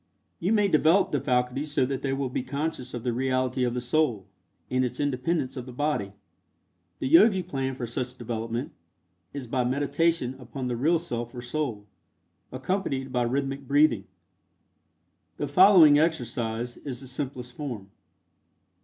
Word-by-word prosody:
You 180 Hz, +5 st, 0 dB
may 210 Hz, -2 st, +4 dB
develop 165 Hz, +2 st, +4 dB
the 145 Hz, -, 0 dB
faculties 125 Hz, +2 st, 0 dB
so 140 Hz, -, +2 dB
that 135 Hz, 0 st, -3 dB
they 135 Hz, -, -1 dB
will 135 Hz, 0 st, -1 dB
be -, -, -1 dB
conscious 135 Hz, -1 st, -4 dB
of 120 Hz, -, -6 dB
the 125 Hz, -2 st, 0 dB
reality 130 Hz, 0 st, 0 dB
of 120 Hz, -1 st, 0 dB
the -, -, 0 dB
Soul, 125 Hz, -, +1 dB, 0.4 s
and 130 Hz, 0 st, +1 dB
its 125 Hz, 0 st, -3 dB
independence 145 Hz, 0 st, -1 dB
of 130 Hz, -1 st, -6 dB
the -, -, -7 dB
body. 125 Hz, -7 st, -1 dB, 0.8 s
The 130 Hz, -, -2 dB
Yogi 185 Hz, -, +6 dB
plan 135 Hz, -6 st, -3 dB
for 125 Hz, -, -4 dB
such 125 Hz, +2 st, -4 dB
development 115 Hz, +2 st, -4 dB, 0.6 s
is 140 Hz, -3 st, -6 dB
by 125 Hz, +1 st, 0 dB
meditation 140 Hz, +2 st, +1 dB
upon 125 Hz, +1 st, -6 dB
the 125 Hz, -1 st, -1 dB
real 155 Hz, +8 st, +3 dB
Self 120 Hz, -7 st, -5 dB
or 120 Hz, -, -6 dB
Soul, 120 Hz, -6 st, -3 dB, 0.7 s
accompanied 135 Hz, -1 st, -2 dB
by 125 Hz, -1 st, +1 dB
rhythmic 135 Hz, +2 st, -2 dB
breathing. 140 Hz, -8 st, +3 dB, 1.3 s
The 145 Hz, -, -2 dB
following 160 Hz, -2 st, +7 dB
exercise 120 Hz, -6 st, -1 dB
is 130 Hz, -5 st, -6 dB
the 135 Hz, -, -9 dB
simplest 125 Hz, -2 st, -5 dB
form. 115 Hz, -10 st, -6 dB
130 Hz, 155 wpm, -27 LUFS, 125-150 Hz, 1.3 s, following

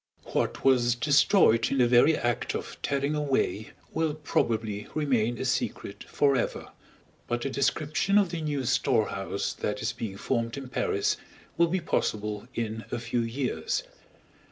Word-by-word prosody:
What -, -, -1 dB
was 120 Hz, -3 st, +4 dB
destroyed 140 Hz, -, +4 dB
in 135 Hz, -, +1 dB
the 125 Hz, -2 st, +5 dB
very 125 Hz, +6 st, +5 dB
act 120 Hz, -1 st, -1 dB
of -, -, -5 dB
tearing 140 Hz, +1 st, 0 dB
away 135 Hz, -7 st, 0 dB, 0.2 s
will 160 Hz, -2 st, 0 dB
probably 110 Hz, -8 st, -1 dB
remain 120 Hz, -6 st, +1 dB
a 130 Hz, -, -3 dB
secret 125 Hz, -5 st, -2 dB
forever; 140 Hz, -4 st, 0 dB, 0.6 s
but 120 Hz, +1 st, -2 dB
a 135 Hz, -, -1 dB
description 155 Hz, +8 st, +1 dB
of 200 Hz, -4 st, +3 dB
the 170 Hz, -2 st, -3 dB
new 145 Hz, -3 st, -2 dB
storehouse 105 Hz, -6 st, 0 dB
that 105 Hz, 0 st, -3 dB
is 110 Hz, 0 st, -1 dB
being 110 Hz, -5 st, -5 dB
formed 115 Hz, +3 st, -1 dB
in 135 Hz, -2 st, -7 dB
Paris 420 Hz, -, 0 dB, 0.4 s
will 170 Hz, 0 st, +4 dB
be 185 Hz, +3 st, 0 dB
possible 105 Hz, -4 st, -2 dB
in 110 Hz, -1 st, -3 dB
a -, -, -1 dB
few 120 Hz, +1 st, -1 dB
years. 125 Hz, -, -2 dB
125 Hz, 150 wpm, -28 LUFS, 115-150 Hz, 0.6 s, the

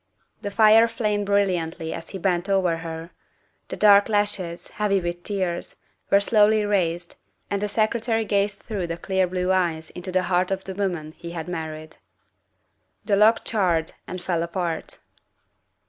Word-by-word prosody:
The 205 Hz, -, -3 dB
fire 220 Hz, +2 st, +6 dB
flamed 210 Hz, -3 st, -1 dB
brilliantly 180 Hz, -5 st, 0 dB
as 165 Hz, -, -8 dB
he 195 Hz, -, -6 dB
bent 180 Hz, 0 st, 0 dB
over 185 Hz, -4 st, +2 dB
her. 165 Hz, 0 st, -7 dB, 0.6 s
The -, -, -5 dB
dark 205 Hz, 0 st, +6 dB
lashes, 205 Hz, -5 st, -1 dB
heavy 205 Hz, -2 st, 0 dB
with 175 Hz, -1 st, -4 dB
tears, 185 Hz, -3 st, -2 dB, 0.3 s
were 200 Hz, -, +6 dB
slowly 210 Hz, 0 st, +3 dB
raised, 175 Hz, -4 st, -1 dB, 0.3 s
and 200 Hz, 0 st, -1 dB
the 210 Hz, -, 0 dB
Secretary 225 Hz, +1 st, 0 dB
gazed 200 Hz, 0 st, 0 dB
through 200 Hz, -6 st, -3 dB
the 165 Hz, 0 st, -4 dB
clear 190 Hz, +1 st, 0 dB
blue 180 Hz, +1 st, -1 dB
eyes 170 Hz, -4 st, 0 dB
into 180 Hz, +1 st, -6 dB
the 185 Hz, 0 st, +1 dB
heart 180 Hz, 0 st, +1 dB
of 190 Hz, 0 st, -2 dB
the 190 Hz, -, -6 dB
woman 180 Hz, -6 st, -3 dB
he 170 Hz, 0 st, -8 dB
had 165 Hz, -1 st, -5 dB
married. 155 Hz, -2 st, -6 dB, 1.1 s
The 205 Hz, -, +2 dB
log 215 Hz, +3 st, +4 dB
charred 175 Hz, -7 st, +1 dB, 0.2 s
and 185 Hz, -, -5 dB
fell 175 Hz, -2 st, -1 dB
apart. 170 Hz, -1 st, -3 dB
185 Hz, 160 wpm, -24 LUFS, 170-205 Hz, 1.1 s, fire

